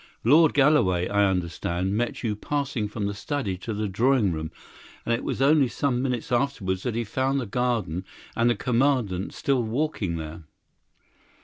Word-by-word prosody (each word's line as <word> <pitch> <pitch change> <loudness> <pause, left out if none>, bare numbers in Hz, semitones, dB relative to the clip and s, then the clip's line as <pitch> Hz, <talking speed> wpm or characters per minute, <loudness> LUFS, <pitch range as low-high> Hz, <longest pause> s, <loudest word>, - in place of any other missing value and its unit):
Lord 155 +6 +5
Galloway, 135 - +3
I 100 0 +3
understand, 90 +1 -2
met 120 +3 -2
you 110 -3 0
passing 135 -2 -2
from 105 0 -4
the 100 - -2
study 105 -1 -3
to 115 - -5
the 105 0 -2
drawing 110 +1 +2
room, 80 -1 -4 0.6
and 115 - +1
it 115 - -1
was 135 - -1
only 145 -1 +5
some 125 +1 -1
minutes 125 -3 -2
afterwards 120 -8 0
that 120 0 -3
he 120 - 0
found 130 +5 0
the 125 - -3
garden 115 -6 -1 0.3
and 115 +1 +3
the 120 - +2
Commandant 115 -5 0
still 135 -3 0
walking 115 - -2
there." 80 +1 -7
115 Hz, 170 wpm, -25 LUFS, 95-135 Hz, 0.6 s, Lord